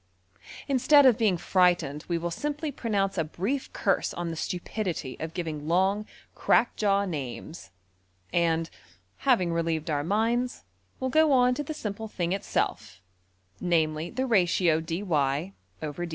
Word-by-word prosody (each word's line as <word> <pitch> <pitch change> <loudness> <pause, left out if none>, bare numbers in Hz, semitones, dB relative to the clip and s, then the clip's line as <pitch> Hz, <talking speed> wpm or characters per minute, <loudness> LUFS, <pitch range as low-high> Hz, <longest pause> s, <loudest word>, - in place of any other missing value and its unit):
Instead 275 +2 +5
of 255 -3 +7
being 210 -6 +2
frightened 175 -5 +1
we 170 - 0
will 170 +1 -3
simply 295 - -3
pronounce 200 -7 -1
a - - +2
brief 200 - -3
curse 195 -3 0
on 175 -1 -3
the 165 - -4
stupidity 175 -4 -3
of 160 0 -6
giving 155 -4 -4
long 190 +5 +1 0.3
crack 240 - +2
jaw 200 -1 +2
names; 155 -1 -6 0.6
and, 165 -1 +1 0.5
having 185 -11 +2
relieved 165 -1 -1
our 145 -1 0
minds, 230 +7 0 0.4
will 260 - -1
go 310 +2 +4
on 250 -1 +5
to 295 - -3
the 295 - -6
simple 220 -3 -5
thing 175 -4 -2
itself, 190 - -2 0.6
namely 160 -2 0
the 260 +2 -2
ratio~$\dfrac{dy}{dx}$. 170 - +1
180 Hz, 135 wpm, -27 LUFS, 165-230 Hz, 0.6 s, of